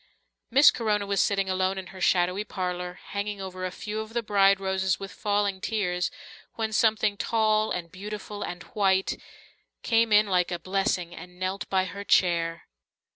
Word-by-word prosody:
Miss 275 +4 +7
Corona 210 -3 0
was 200 0 +1
sitting 195 -1 +1
alone 185 +1 0
in 190 -1 -6
her 190 - -10
shadowy 180 +3 +2
parlour, 180 -3 -4 0.2
hanging 205 0 -3
over 185 -1 -6
a - - -7
few 210 +3 -5
of 220 +1 -6
the 235 -1 -1
bride 195 -2 +4
roses 190 -1 0
with 195 -1 -7
falling 205 -2 -1
tears, 180 -6 -1 0.5
when 220 -1 -2
something 215 -2 +2
tall 215 0 +2
and 170 -2 -4
beautiful 205 +2 -7
and 175 -2 -5
white, 195 -2 +1 0.6
came 230 -1 +2
in 210 0 +6
like 180 -3 +1
a 175 - -2
blessing 185 -1 -1
and 180 0 -11
knelt 185 +2 -3
by 190 -1 +2
her 200 +3 -7
chair. 170 -4 +2
195 Hz, 170 wpm, -27 LUFS, 185-210 Hz, 0.6 s, Miss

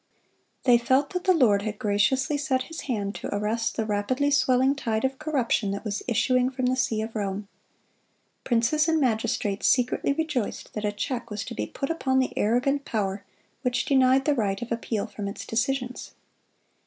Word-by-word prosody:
They 245 -2 +5
felt 265 +4 +2
that 360 -1 -3
the 375 - +5
Lord 215 -10 +4
had 210 0 -4
graciously 215 +8 +1
set 265 -3 0
His 325 +4 -7
hand 205 -4 -1
to - - -6
arrest 225 +2 -1
the 220 - 0
rapidly 225 +7 0
swelling 265 -1 +3
tide 225 -4 -1
of 265 0 -2
corruption 265 -9 0
that 200 +3 -4
was 205 -1 -2
issuing 250 +2 +2
from 255 -1 -3
the 255 +1 +2
see 220 -4 0
of 225 +1 -7
Rome. 200 -1 -3 1.0
Princes 255 +7 +2
and 320 -1 +3
magistrates 220 -5 0
secretly 250 +2 +2
rejoiced 290 -7 -2
that 210 0 -3
a 205 - +1
check 235 +3 -4
was 210 -1 -4
to - - -6
be 105 0 -3
put 275 - -3
upon 265 -5 0
the 260 -1 +1
arrogant 255 +6 +1
power 200 -5 -2 0.4
which 250 -1 0
denied 265 -1 +4
the 295 - +3
right 200 -6 0
of 240 - -9
appeal 230 -2 -2
from 205 -2 -6
its 200 - -6
decisions. 250 +1 -2
245 Hz, 180 wpm, -26 LUFS, 210-265 Hz, 1.0 s, They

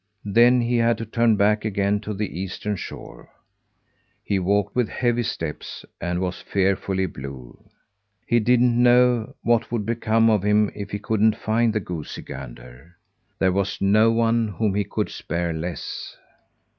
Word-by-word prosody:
Then 120 +4 +5
he 120 +1 0
had 115 -1 +2
to 115 - -5
turn 115 0 +2
back 105 +1 +2
again 100 -1 0
to 105 0 -5
the 100 -3 -4
eastern 95 +2 -3
shore. - - -9 0.9
He 100 - 0
walked 100 +2 0
with 125 -3 +1
heavy 120 -1 0
steps, 110 -10 -5 0.2
and 90 +1 -2
was 90 -1 -3
fearfully 95 0 0
blue. 70 -6 -10 0.6
He 120 - +3
didn't 120 +1 +3
know 125 0 +4
what 120 -1 +1
would 115 -4 -2
become 115 0 +2
of 110 -3 +3
him 105 +1 +2
if 100 -1 -7
he 105 - -3
couldn't 110 +1 +1
find 115 +1 +1
the 110 - 0
goosey 85 -5 -6
gander. 65 +5 -11 0.4
There 95 -1 +2
was 95 +1 -1
no 110 +3 +4
one 115 0 +2
whom 105 0 -1
he 100 0 0
could - - -2
spare 85 +1 -3
less. 85 +2 -6
105 Hz, 155 wpm, -23 LUFS, 95-115 Hz, 0.9 s, Then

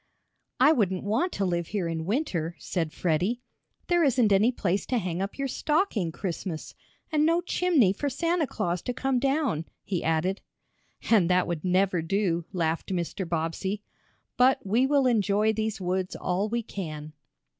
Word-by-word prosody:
"I 265 +4 +7
wouldn't 190 - +1
want 225 - 0
to 200 - -1
live 170 -2 -1
here 200 -5 -2
in 160 -1 -3
winter," 185 - -1
said 165 -4 -2
Freddie. 185 +11 0 0.4
"There 345 -1 +3
isn't 250 -6 +3
any 210 +5 +4
place 195 -5 -1
to 250 - +1
hang 180 -4 -2
up 195 +1 -4
your 275 0 -1
stocking 285 - 0
Christmas, 170 -2 -5 0.4
and 305 -1 +3
no 330 +2 +3
chimney 350 - +2
for 285 +8 -2
Santa 335 +3 0
Claus 180 -7 -2
to 250 - -4
come 265 -1 0
down!" 270 - 0 0.2
he 185 -4 -2
added. 165 +5 0 0.7
"And 195 -6 +5
that 180 0 +3
would 170 -3 -3
never 185 -1 +2
do!" 170 -1 0
laughed 165 -2 -1
Mr. 180 0 -3
Bobbsey. 175 +5 -2 0.5
"But 255 -1 +4
we 230 +7 +3
will 280 -1 +3
enjoy 215 -2 +2
these 220 -1 -2
woods 185 0 -2
all 185 +4 -1
we 235 +1 -1
can." 155 -7 -6
200 Hz, 165 wpm, -27 LUFS, 175-250 Hz, 0.7 s, I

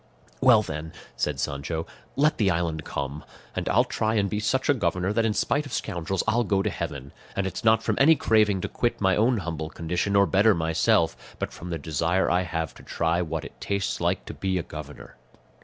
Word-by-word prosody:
"Well 120 -5 +6
then," 80 -2 -6 0.2
said 75 -3 -1
Sancho, 70 +5 -3 0.3
"let 150 +1 +2
the 100 -3 +3
island 85 -3 -1
come; 70 +1 -4 0.3
and - - -2
I'll - - +4
try 110 0 -1
and 100 -3 +1
be 105 - -1
such 130 +5 0
a 145 - +5
governor, 90 -4 0
that 115 0 +2
in 105 - -1
spite 145 +7 0
of 130 - -10
scoundrels 90 -2 -2
I'll 115 +2 +3
go 100 -3 +1
to 105 - 0
heaven; 70 -6 -5 0.2
and 100 - 0
it's 95 +3 -4
not 110 0 +4
from - - 0
any 160 +4 +7
craving 105 -7 +3
to - - -2
quit 120 - -1
my 95 -2 +3
own 115 +4 +3
humble 80 -4 -4
condition 90 +5 -2
or 100 0 +6
better 100 +2 +4
myself, 80 0 +1
but - - -4
from 90 - -8
the 85 - -2
desire 80 +5 0
I 90 +1 +3
have 80 -3 -3
to - - -15
try 85 +1 0
what 80 -2 -3
it - - -12
tastes 100 -1 -2
like - - 0
to - - -7
be 95 -1 -1
a 85 - -1
governor." 75 -5 -10
90 Hz, 215 wpm, -26 LUFS, 80-110 Hz, 0.3 s, any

